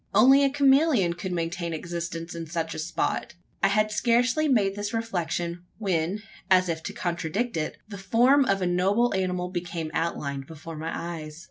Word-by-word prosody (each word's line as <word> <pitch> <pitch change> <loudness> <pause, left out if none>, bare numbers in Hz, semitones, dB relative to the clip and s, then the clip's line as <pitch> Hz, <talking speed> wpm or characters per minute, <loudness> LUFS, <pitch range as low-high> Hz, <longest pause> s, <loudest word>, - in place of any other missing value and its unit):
Only 265 +6 +7
a 275 - +4
chameleon 275 - +4
could 180 +2 -5
maintain 170 0 -2
existence 170 0 -5
in 165 -1 -6
such 165 0 -3
a - - -6
spot! 160 +2 -2 0.3
I - - +5
had 215 +2 +2
scarcely 245 +7 +2
made 205 -8 +2
this 205 +2 -3
reflection, 175 -5 -2
when, 190 0 -1 0.3
as 185 -1 +4
if 160 -1 -2
to - - -4
contradict 175 +7 -2
it, 155 -1 -2
the 200 -2 -8
form 245 +8 +4
of 195 -4 +1
a - - +1
noble 195 +7 +2
animal 180 -1 -1
became 175 -3 -4
outlined 140 -5 -2
before 160 +1 -9
my 160 +1 -4
eyes. 160 -2 -6
180 Hz, 170 wpm, -26 LUFS, 165-220 Hz, 0.3 s, Only